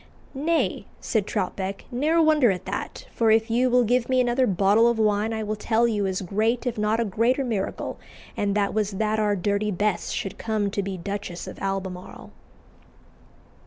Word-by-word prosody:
"Nay," 320 +4 0
said 215 -4 -1
Troutbeck, 190 +1 -3
"ne'er 300 +7 +2
wonder 310 -6 +5
at 185 -2 -2
that, - - -5
for 225 -1 +1
if 220 +1 +3
you 250 +2 +3
will 250 0 +4
give 245 +2 +1
me 255 0 +3
another 250 +1 +2
bottle 200 +4 +4
of 235 -1 +2
wine 215 0 +1
I 220 -1 -2
will 215 0 -2
tell 225 +2 +1
you 205 -4 0
as 190 0 -2
great 220 +7 0
if 245 - -1
not 210 +2 +1
a 235 - +1
greater 230 +7 +1
miracle, 220 -6 -3 0.4
and 200 -1 0
that 205 -1 +1
was 210 -2 0
that 215 +2 0
our 210 -1 +2
Dirty 200 +2 0
Bess 205 -1 -1
should 195 - -4
come 215 -3 -1
to 200 - -1
be 195 -1 -4
Duchess 195 -1 -5
of - - -9
Albemarle." 190 -2 -5
215 Hz, 185 wpm, -25 LUFS, 200-235 Hz, 0.4 s, wonder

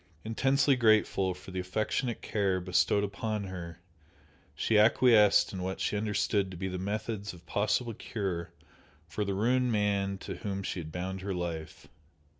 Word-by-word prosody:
Intensely 135 +5 +3
grateful 110 -5 +3
for 95 - -11
the 95 - -3
affectionate 110 +6 -2
care 100 -3 0
bestowed 90 +3 +2
upon 105 +1 -2
her, 90 -3 -7 0.8
she 110 - 0
acquiesced 105 -1 +5
in 95 - -4
what 95 +1 -3
she - - -1
understood 105 -1 0
to 90 - -8
be 95 +2 -3
the 90 -1 -4
methods 105 +1 -3
of 85 -1 -15
possible 115 +3 0
cure 95 -6 -4 0.6
for 105 +5 -2
the 100 -1 -2
ruined 125 +4 +2
man 100 -2 0
to - - -7
whom 100 -3 -4
she 95 - -3
had 80 -2 -7
bound 95 +2 -4
her 95 0 -3
life. 80 -4 -5
100 Hz, 160 wpm, -30 LUFS, 95-110 Hz, 0.8 s, acquiesced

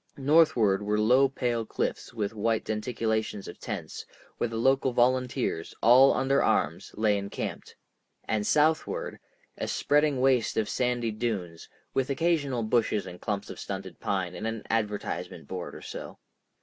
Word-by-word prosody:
Northward 140 -9 +4
were 105 +1 0
low 125 +5 +5
pale 120 -3 -1
cliffs - - -3
with 110 -2 -3
white 110 +1 0
denticulations 110 -1 -2
of - - -9
tents, - - -6 0.4
where - - +1
the 115 0 -5
local 130 +2 +2
volunteers, 125 -7 0
all 130 +4 +7
under 135 +1 +2
arms, - - 0
lay 105 -1 +2
encamped, 100 0 -6 0.5
and 105 -1 0
southward, 160 - +1 0.4
a - - -2
spreading 145 -2 +2
waste 130 -3 +2
of 110 -1 +1
sandy 125 -2 0
dunes, 100 -7 -4 0.2
with 135 0 0
occasional 140 -5 0
bushes 110 -3 +1
and 90 -1 -10
clumps 100 -1 -3
of - - -9
stunted 95 -3 -6
pine 95 -3 -2
and 110 +4 -4
an 115 -1 -4
advertisement 105 -9 -2
board 85 -6 -6
or - - -10
so. - - -8
115 Hz, 150 wpm, -28 LUFS, 105-130 Hz, 0.5 s, all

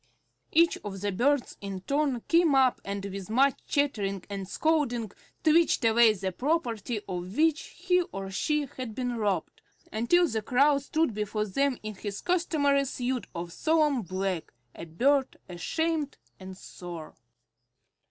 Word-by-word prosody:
Each 335 +1 +4
of 195 -2 -6
the 205 0 -1
birds 255 +7 +1
in 195 -2 -5
turn 280 +2 0
came 330 -1 +3
up 260 -2 +3
and 200 0 -4
with 195 -1 -6
much 265 +4 +3
chattering 205 -10 0
and 195 -1 -4
scolding 245 - 0 0.3
twitched 320 -5 +4
away 225 0 +6
the 190 -2 -3
property 240 - -1
of 180 +2 -5
which 315 0 +3
he 360 0 +1
or 195 0 -5
she 300 +8 0
had 255 -4 -7
been 245 -1 -2
robbed, 200 -6 -2 0.3
until 340 +11 +3
the 220 -6 -2
Crow 275 +6 +3
stood 310 -1 0
before 210 0 -2
them 265 +6 0
in 215 0 -5
his 205 0 -6
customary 295 -6 +2
suit 255 -1 -3
of 170 0 -5
solemn 305 -5 +2
black, 185 -2 -3 0.2
a - - -8
bird 265 - +1
ashamed 305 - -2 0.2
and 190 0 -9
sore. 175 -4 -9
240 Hz, 145 wpm, -28 LUFS, 195-290 Hz, 0.3 s, away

